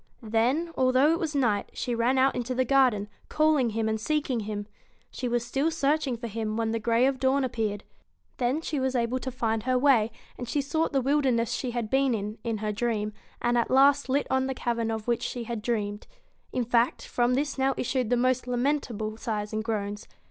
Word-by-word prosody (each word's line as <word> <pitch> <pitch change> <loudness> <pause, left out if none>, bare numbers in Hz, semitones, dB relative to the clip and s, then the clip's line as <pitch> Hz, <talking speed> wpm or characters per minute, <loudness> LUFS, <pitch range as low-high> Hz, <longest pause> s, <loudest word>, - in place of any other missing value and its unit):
Then, 245 +10 +1
although 260 +3 +4
it 335 - +1
was 315 -3 -2
night, 225 -7 +1
she 245 - -3
ran 235 +3 +2
out 265 +1 +4
into 250 +1 -2
the 255 +1 +2
garden, 250 -6 +3 0.2
calling 305 -5 +3
him 220 0 -1
and 220 0 -1
seeking 285 -2 0
him. 205 -1 -4 0.5
She 255 - -4
was 240 -1 0
still 275 +6 0
searching 295 -4 0
for 235 - -7
him 220 -1 -3
when 225 -1 0
the 230 - -1
grey 230 +2 +2
of 270 -1 +1
dawn 270 +1 +2
appeared. 220 -5 -2 0.5
Then 255 +5 0
she 305 -3 -2
was 260 0 -1
able 240 +1 0
to 260 - -4
find 225 -3 -1
her 255 +2 +1
way, 250 -5 +4 0.3
and 245 -1 -5
she 290 - 0
sought 315 +4 0
the 275 - +2
wilderness 260 -5 +2
she 255 - -2
had 235 -3 -3
been 270 -2 +3
in, 210 +1 -5
in 230 -2 -1
her 210 - 0
dream, 215 -1 -1 0.3
and 240 0 +3
at 235 - 0
last 275 +1 +4
lit 280 +2 +2
on 265 0 +2
the 265 - -3
cavern 235 -2 -1
of 220 0 -4
which 235 -1 +1
she 245 - -3
had 230 -1 -4
dreamed. 210 -3 -2 0.4
In 250 -2 -1
fact, 235 +1 +1
from 245 +1 +1
this 280 0 -1
now 265 0 +2
issued 255 -2 -1
the 245 - +3
most 255 0 +1
lamentable 245 -4 -1
sighs 210 -2 -3
and 215 0 -1
groans. 205 -2 -3
245 Hz, 215 wpm, -27 LUFS, 225-265 Hz, 0.5 s, although